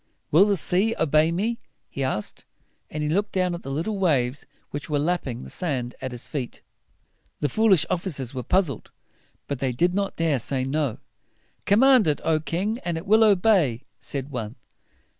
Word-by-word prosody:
"Will 170 +7 +7
the 205 -2 +2
sea 190 +7 +1
obey 155 +2 +3
me?" 220 +7 -1 0.3
he 140 - -4
asked; 120 -5 -3 0.5
and 150 0 -4
he 150 - -1
looked 200 +6 0
down 185 -2 +1
at 170 - -5
the - - -8
little 170 +9 -2
waves 140 -7 +1 0.2
which 145 +1 -5
were 150 - +1
lapping 145 -6 -1
the - - -9
sand 130 -9 -2
at 130 - -4
his 125 -1 -6
feet. 130 -5 -5 0.8
The 145 - +1
foolish 200 -7 +4
officers 145 -9 -3
were 130 - -3
puzzled, 175 - 0 0.6
but 140 -3 -3
they 130 -1 0
did 175 +9 +1
not 200 0 -1
dare 160 -4 +1
to - - -4
say 130 -2 -1
"No." 135 -2 -1 0.7
"Command 245 0 +6
it, 150 - +1
O 160 -1 +3
king! 190 +9 -2
and 170 -2 -2
it 165 - -6
will 220 +2 +5
obey," 185 - +3 0.2
said 140 0 -6
one. 115 -3 -5
160 Hz, 180 wpm, -25 LUFS, 135-190 Hz, 0.8 s, Will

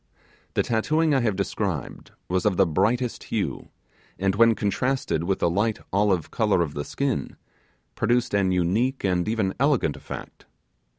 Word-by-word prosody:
The - - +3
tattooing 155 +8 +1
I 135 - +4
have 115 -5 0
described 95 -5 -3 0.2
was 90 0 0
of 105 -4 +1
the 95 - +5
brightest 110 +9 0
blue, - - -2 0.5
and 95 0 +1
when 115 +2 +5
contrasted 105 -5 -1
with 95 +1 +1
the - - +1
light 105 +6 +1 0.2
olive 100 -4 +1
colour 105 -6 +2
of 75 -3 -5
the 70 - -3
skin, 135 - -2 0.6
produced 120 +2 +1
an 100 -2 +2
unique 100 +10 +1
and 90 -3 +1
even 110 -4 0
elegant 135 - +2
effect. - - -9
100 Hz, 155 wpm, -25 LUFS, 95-120 Hz, 0.6 s, the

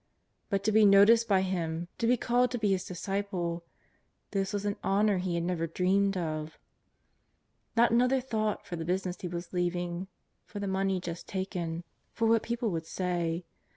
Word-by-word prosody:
But 195 -1 0
to 215 - +2
be 215 +1 +5
noticed 210 +3 +6
hj 190 -1 +3
Him^ 170 -1 -2
to 230 - +1
be 245 +1 +4
called 245 +2 +2
to 245 - -2
be 210 -3 +1
His 185 -1 0
disciple 180 -2 -3 0.3
— - - -45
this 195 -1 -1
was 205 -1 -2
an 205 0 0
honour 200 0 +2
he 180 -1 -1
had 170 - -1
never 170 -1 -1
dreamed 195 +3 +1
of. 155 -2 -3 1.2
^ot 235 +1 +5
another 250 +3 +4
thought 220 -4 -2
for 175 - -5
the 165 - -4
business 180 +1 -2
he 180 - -3
was 175 +1 -6
leaving, 175 0 -1 0.4
for 210 - -10
the 205 - -3
money 190 0 0
just 170 -1 -6
taken, 175 -3 -3 0.3
for 230 - 0
what 225 0 +4
people 235 -2 -2
would 165 -1 -3
say. 175 -2 -2
190 Hz, 185 wpm, -30 LUFS, 175-210 Hz, 1.2 s, noticed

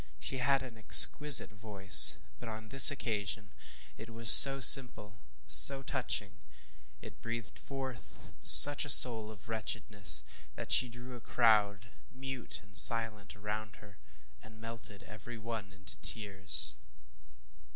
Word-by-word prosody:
She 130 - -11
had 135 +1 -6
an 115 -4 -19
exquisite, 145 +4 +3
voice; 100 -5 +2 0.2
but - - -15
on 110 0 -16
this 135 +3 +6
occasion 105 -6 -10 0.5
it 110 +1 -17
was 115 0 +1
so 135 0 +7
simple, 110 -4 +1 0.3
so 135 -1 0
touching, 105 -8 -10 0.6
it - - -19
breathed 115 -1 -13
forth 135 -4 -16
such 145 0 +3
a 145 - -12
soul 115 -5 -1
of 110 -2 -21
wretchedness 105 -4 -3 0.3
that - - -14
she 125 - -3
drew 120 +2 -17
a 120 - -18
crowd, 105 -3 -6 0.2
mute 130 -1 -14
and 100 -1 -23
silent, 110 0 -4
around 105 +1 -13
her 100 -1 -25 0.4
and 110 0 -24
melted 115 -3 -12
every 110 +3 -17
one 110 -3 -14
into 95 -1 -12
tears. 100 -3 0
110 Hz, 130 wpm, -25 LUFS, 105-125 Hz, 0.6 s, so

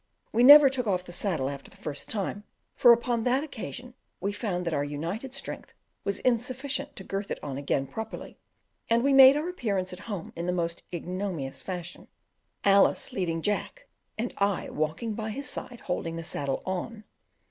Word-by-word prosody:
We 230 - +2
never 290 +3 +11
took 260 -3 -1
off 180 -3 +1
the 180 - -11
saddle 175 -6 -1
after 140 0 -6
the - - -18
first 145 -2 -6
time, 205 -1 -2 0.3
for 240 - +7
upon 235 0 +2
that 255 +4 +2
occasion 250 -3 -7 0.3
we 200 +3 -1
found 195 -4 -3
that 170 - -1
our 145 - +1
united 165 - -4
strength 275 +1 -6 0.3
was 200 0 -1
insufficient 260 +4 0
to 190 - -8
girth 195 +1 -4
it - - -2
on 140 -2 -4
again 140 -1 0
properly, 220 +9 -7 0.5
and 230 +1 +3
we 280 0 +3
made 270 +1 +9
our 305 +3 -2
appearance 200 - -2
at 180 - -9
home 195 -6 -5
in 170 +1 -4
the 180 - +1
most 170 -1 -2
ignominious 175 -5 -4
fashion 180 -1 -6 0.6
Alice 200 0 +4
leading 165 -3 -1
Jack, 485 - -2 0.3
and 235 +2 -2
I 200 -2 0
walking 155 +9 -2
by 220 +1 -4
his 275 +6 -4
side 245 -2 -6
holding 165 -2 -3
the 165 - -5
saddle 140 -4 -3
on. 210 +4 -4
200 Hz, 180 wpm, -28 LUFS, 175-245 Hz, 0.6 s, never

